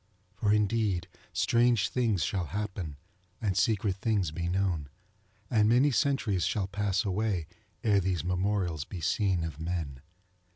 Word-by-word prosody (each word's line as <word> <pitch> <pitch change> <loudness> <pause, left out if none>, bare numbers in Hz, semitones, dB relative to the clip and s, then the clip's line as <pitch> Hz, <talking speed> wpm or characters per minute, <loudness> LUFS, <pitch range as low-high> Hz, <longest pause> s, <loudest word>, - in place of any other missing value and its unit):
For 105 +1 0
indeed 105 -4 +1 0.2
strange 115 +2 +3
things 115 -7 +1
shall 95 -3 -1
happen, 95 -5 -4 0.4
and 100 -4 -1
secret 100 0 +1
things 100 -6 0
be 85 +2 -3
known, 90 -6 0 0.6
and 110 -2 +3
many 130 +5 +5
centuries 120 - +1
shall 95 +4 0
pass 100 +1 -1
away, 100 -3 0 0.4
ere 105 -3 +4
these 90 -4 -1
memorials 90 -3 0
be 90 +4 -7
seen 95 +1 +1
of 80 -2 -5
men. 80 -6 -3
95 Hz, 135 wpm, -29 LUFS, 90-105 Hz, 0.6 s, many